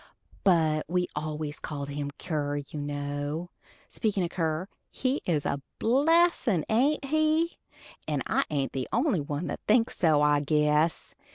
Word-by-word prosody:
But 160 Hz, -5 st, +3 dB
we 180 Hz, +1 st, +1 dB
always 150 Hz, 0 st, -4 dB
called 140 Hz, -2 st, -5 dB
him 145 Hz, 0 st, -3 dB
Kier, 145 Hz, -4 st, -2 dB, 0.2 s
you 150 Hz, -, -4 dB
know. 145 Hz, +3 st, -3 dB, 0.4 s
Speakin' 205 Hz, -5 st, -1 dB
o' 170 Hz, -, -1 dB
Kier, 165 Hz, -1 st, -1 dB, 0.2 s
he 260 Hz, +2 st, -1 dB
is 155 Hz, -5 st, +1 dB
a 140 Hz, -, -1 dB, 0.2 s
blessin', 275 Hz, -, +3 dB
ain't 275 Hz, +6 st, +2 dB
he? 310 Hz, +3 st, +1 dB, 0.5 s
and -, -, -1 dB
I -, -, +2 dB
ain't 140 Hz, -3 st, -1 dB
the 130 Hz, -2 st, -3 dB
only 240 Hz, -, +2 dB
one 145 Hz, +3 st, -3 dB
that -, -, -4 dB
thinks 225 Hz, +2 st, +3 dB
so, 155 Hz, -4 st, +3 dB
I 150 Hz, 0 st, +4 dB
guess. 150 Hz, +2 st, +1 dB
160 Hz, 150 wpm, -28 LUFS, 145-225 Hz, 0.5 s, I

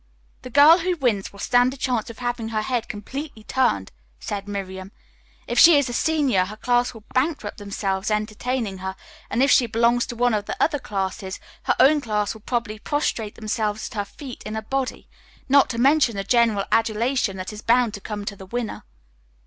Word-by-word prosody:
"The 255 Hz, -, -9 dB
girl 295 Hz, +7 st, +7 dB
who 360 Hz, +1 st, 0 dB
wins 230 Hz, -9 st, 0 dB
will 200 Hz, -, -15 dB
stand 245 Hz, +5 st, +2 dB
a -, -, -14 dB
chance 250 Hz, -4 st, -1 dB
of 230 Hz, -, -10 dB
having 240 Hz, -2 st, -3 dB
her 215 Hz, -1 st, -1 dB
head 245 Hz, -1 st, -1 dB
completely 230 Hz, +3 st, -7 dB
turned," 215 Hz, -, 0 dB, 0.3 s
said 200 Hz, -, -5 dB
Miriam. 190 Hz, -1 st, -6 dB, 0.5 s
"If -, -, 0 dB
she 330 Hz, -2 st, +9 dB
is 285 Hz, -3 st, +1 dB
a -, -, -4 dB
senior, 275 Hz, -10 st, +2 dB
her 210 Hz, +3 st, -9 dB
class 245 Hz, +1 st, +1 dB
will 220 Hz, -, -12 dB
bankrupt 260 Hz, -5 st, -1 dB
themselves 200 Hz, -1 st, -2 dB
entertaining 215 Hz, 0 st, -2 dB
her, 190 Hz, 0 st, -5 dB, 0.3 s
and 245 Hz, -, +2 dB
if 280 Hz, -, +4 dB
she 245 Hz, -, +5 dB
belongs 235 Hz, +2 st, +2 dB
to 240 Hz, -, -6 dB
one 245 Hz, 0 st, +2 dB
of 210 Hz, -1 st, -1 dB
the -, -, -5 dB
other 295 Hz, -3 st, +2 dB
classes, 190 Hz, -3 st, -4 dB, 0.3 s
her -, -, +2 dB
own 290 Hz, +3 st, +5 dB
class 210 Hz, -4 st, -1 dB
will 220 Hz, -, -13 dB
probably 230 Hz, -2 st, -3 dB
prostrate 230 Hz, -5 st, -2 dB
themselves 215 Hz, -1 st, -2 dB
at -, -, -13 dB
her 205 Hz, -2 st, -1 dB
feet 255 Hz, +5 st, -10 dB
in 215 Hz, -, -5 dB
a 220 Hz, -, -3 dB
body, 265 Hz, +3 st, -3 dB, 0.4 s
not 280 Hz, 0 st, +5 dB
to 235 Hz, -, -4 dB
mention 270 Hz, -2 st, +4 dB
the 195 Hz, -, -2 dB
general 225 Hz, -2 st, +2 dB
adulation 225 Hz, -1 st, +1 dB
that 185 Hz, +3 st, -6 dB
is 210 Hz, -, -8 dB
bound 235 Hz, -1 st, +3 dB
to 200 Hz, -, -7 dB
come 205 Hz, -1 st, -5 dB
to 200 Hz, -, -4 dB
the 190 Hz, -1 st, -12 dB
winner." 235 Hz, +1 st, -4 dB
230 Hz, 200 wpm, -23 LUFS, 205-255 Hz, 0.5 s, she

